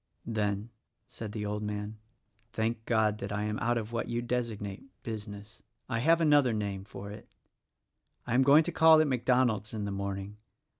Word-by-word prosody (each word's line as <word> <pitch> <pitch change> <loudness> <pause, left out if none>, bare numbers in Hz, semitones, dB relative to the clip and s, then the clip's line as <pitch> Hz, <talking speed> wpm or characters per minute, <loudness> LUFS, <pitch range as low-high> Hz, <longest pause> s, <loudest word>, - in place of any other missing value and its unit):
"Then," 105 -1 -2 0.3
said 110 -2 -7
the 105 -1 -4
old 105 0 -2
man, 105 0 -4 0.5
"thank 110 0 -1
God 110 -2 +2
that 100 0 -5
I 105 +1 -1
am 105 0 -2
out 120 +2 +1
of 110 0 -4
what 115 - -1
you 120 0 -2
designate 115 -5 -3 0.2
Business. 105 0 -7 0.3
I 115 -2 -1
have 165 +7 +4
another 145 -6 +4
name 100 -2 -3
for 100 0 -8
it. 105 - -10 1.0
I - - -2
am 125 - +5
going 140 +4 +7
to 175 - -3
call 160 -1 +7
at 155 - +4
MacDonald's 125 -5 +1
in 105 -1 -3
the 100 - -3
morning. 100 +1 -4
110 Hz, 180 wpm, -30 LUFS, 105-120 Hz, 1.0 s, going